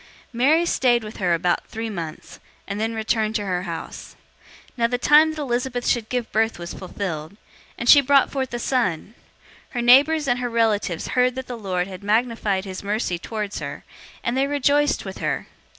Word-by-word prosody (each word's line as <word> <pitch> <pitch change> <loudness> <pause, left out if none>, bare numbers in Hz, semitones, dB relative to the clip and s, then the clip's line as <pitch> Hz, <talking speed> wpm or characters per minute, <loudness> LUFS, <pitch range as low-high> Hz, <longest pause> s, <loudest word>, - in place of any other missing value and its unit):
001:056 - - -23 0.3
Mary 295 +8 +3
stayed 245 -7 +2
with 215 0 -9
her 175 -3 +2
about 175 +1 0
three 225 +1 -5
months, 170 -7 -7 0.3
and 200 +1 -4
then 225 +1 -1
returned 220 0 0
to 205 -2 -1
her 180 -2 -1
house. 165 - -7 0.5
001:057 - - -33
Now 230 -1 +3
the 245 +1 -1
time 300 +5 +5
that 310 -1 -5
Elizabeth 245 -2 -2
should 230 -3 0
give 245 -2 -2
birth 225 +1 +1
was 175 0 -7
fulfilled, 180 -2 -5 0.4
and 240 - -4
she 285 +3 +9
brought 275 0 +3
forth 265 -2 -2
a 240 - -3
son. 225 -7 -1 0.6
001:058 - - -26
Her 240 - 0
neighbors 285 +5 +5
and 245 -1 +1
her 245 -1 -2
relatives 215 -7 0
heard 250 0 +2
that 260 0 -5
the 250 - -6
Lord 185 -5 -2
had 185 0 -9
magnified 215 -2 0
his 185 -1 -6
mercy 200 -4 -2
towards 210 0 -4
her, 140 -2 -6 0.4
and 235 - -1
they 270 +1 +2
rejoiced 290 +1 +1
with - - -7
her. - - -2
230 Hz, 200 wpm, -23 LUFS, 200-255 Hz, 0.6 s, she